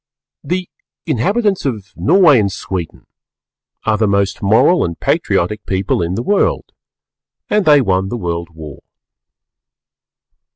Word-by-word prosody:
The 180 0 -3 0.4
inhabitants 195 - 0
of 105 -9 -4
Norway 145 - +4
and 100 -2 0
Sweden 90 -3 -6 0.8
are 110 -1 +1
the 110 - +2
most 100 0 0
Moral 110 - +3
and 85 -1 -4
Patriotic 105 +5 -1
People 95 -1 -1
in 85 +2 -2
the 115 - -3
World, 205 +6 0 0.8
and 210 -2 +2
they 150 -2 +6
won 95 -4 0
the 120 - -4
World 85 -4 -4
War. 80 -4 -11
105 Hz, 125 wpm, -16 LUFS, 95-150 Hz, 0.8 s, they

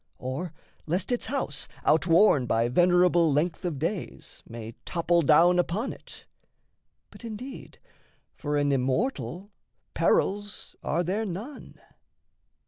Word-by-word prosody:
Or 135 +7 -4 0.4
lest 180 +8 -1
its 245 - -1
house, 260 - -3 0.2
Outworn 165 - +4
by 115 +1 +1
venerable 175 +2 +4
length 160 +6 0
of 170 -5 -2
days, 165 +6 -5
May 115 -1 -7
topple 170 0 +1
down 170 +4 +5
upon 195 +8 -1
it? - - -14 0.9
But - - -14
indeed 235 +4 -8 0.6
For 145 -1 -2
an 145 0 +2
immortal 140 - -1 0.4
perils 205 +1 0
are 170 +4 0
there 195 +6 -1
none. 210 +11 -8
175 Hz, 115 wpm, -27 LUFS, 145-200 Hz, 0.9 s, down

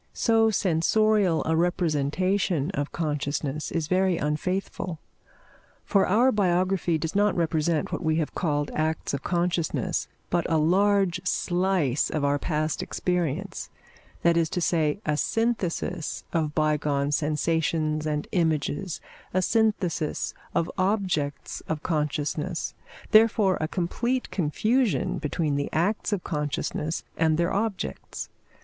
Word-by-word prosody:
So 225 -1 +3
sensorial 195 0 +2
a 160 - +1
representation 175 0 +1
of 145 -7 -3
consciousness 150 -2 -2
is 165 -2 -1
very 185 0 +2
unfaithful; 175 +3 -2 0.9
for 200 -3 +3
our 240 +7 +4
biography 185 -4 +1
does 160 +3 -4
not 205 0 +3
represent 160 -1 0
what - - -2
we 160 -1 +2
have 160 -2 -1
called 145 -4 -1
acts 155 -1 -1
of 140 - -2
consciousness, 175 -1 -1 0.2
but 175 -1 0
a 160 - +4
large 190 +2 +3
slice 175 -7 +1
of 150 -2 -1
our 145 0 +2
past 155 -1 -1
experience 180 +1 -2 0.5
that 170 0 +4
is 165 -2 +2
to 180 - -2
say, 160 0 +1
a 150 - +1
synthesis 185 -6 -1
of 155 -3 0
bygone 150 -2 +1
sensations 155 0 0
and 150 -1 -2
images, 160 0 0 0.3
a 185 - +4
synthesis 200 -8 0 0.2
of 170 - +1
objects 185 -8 -1
of 160 -1 -3
consciousness; 150 +1 -1 0.4
therefore 215 -3 +5
a 155 - 0
complete 235 +9 -1
confusion 215 - +1
between 150 -1 -1
the 140 - -2
acts 195 +7 0
of 200 -4 -1
consciousness 150 +1 -2
and 160 -1 +3
their 170 +1 +1
objects. 205 0 -3
170 Hz, 125 wpm, -26 LUFS, 155-190 Hz, 0.9 s, therefore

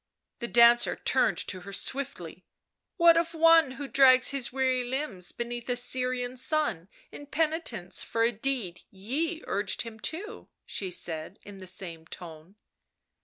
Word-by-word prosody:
The 235 - -3
dancer 235 0 +5
turned - - +1
to 185 - -4
her 200 +2 -10
swiftly. 190 - -4 0.3
" - - -59
What 335 -2 +6
of 335 0 0
one 325 -4 +5
who 280 +1 -6
drags 255 0 +6
his 275 -3 -1
weary 260 -1 +1
limbs 245 -8 -3
beneath 240 0 -6
a 245 - +1
Syrian 250 0 -1
sun 260 - 0 0.2
in 290 - -10
penitence 300 - -1
for 230 - -1
a 230 - +3
deed 225 -6 -3
ye 295 - -3
urged 200 -1 -2
him 225 -1 -10
to?" 420 - -3 0.2
she 190 - -4
said 165 0 -4
in 205 -1 -11
the 185 - -10
same 165 -3 -5
tone. 165 +2 -11
245 Hz, 155 wpm, -28 LUFS, 195-280 Hz, 0.3 s, What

